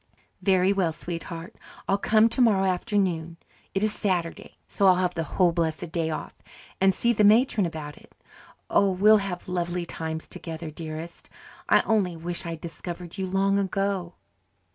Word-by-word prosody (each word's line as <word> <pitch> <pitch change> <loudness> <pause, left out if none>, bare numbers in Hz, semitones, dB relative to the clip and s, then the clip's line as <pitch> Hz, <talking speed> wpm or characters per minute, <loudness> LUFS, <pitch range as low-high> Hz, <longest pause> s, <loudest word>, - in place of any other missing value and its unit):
"Very 190 0 +3
well, 185 -4 +1
sweetheart. 165 +1 -7 0.3
I'll 195 - +2
come 215 +2 +4
tomorrow 225 -5 +3
afternoon 180 -4 -1 0.4
it 195 - +1
is 215 0 +3
Saturday, 175 -4 -2
so 200 - +2
I'll 185 - +7
have 180 -1 0
the 165 - -2 0.2
whole 180 -2 +5
blessed 165 0 -2
day 165 -1 -1
off 155 - -5 0.5
and 195 0 +6
see 235 +5 +1
the 210 - +2
matron 215 -2 +4
about 150 -3 -7
it. - - -19 0.5
Oh, 200 - +3
we'll 205 +4 +5
have 195 -3 -4
lovely 175 -1 -2
times 160 -1 -5
together, 160 -1 -7
dearest. 160 +2 -8 0.4
I - - +6
only 195 -6 0
wish 170 +1 -3
I'd 165 -1 -5
discovered 175 +2 -7
you 190 - -1
long 195 +1 +2
ago." 195 -2 -2
180 Hz, 160 wpm, -26 LUFS, 165-195 Hz, 0.5 s, I'll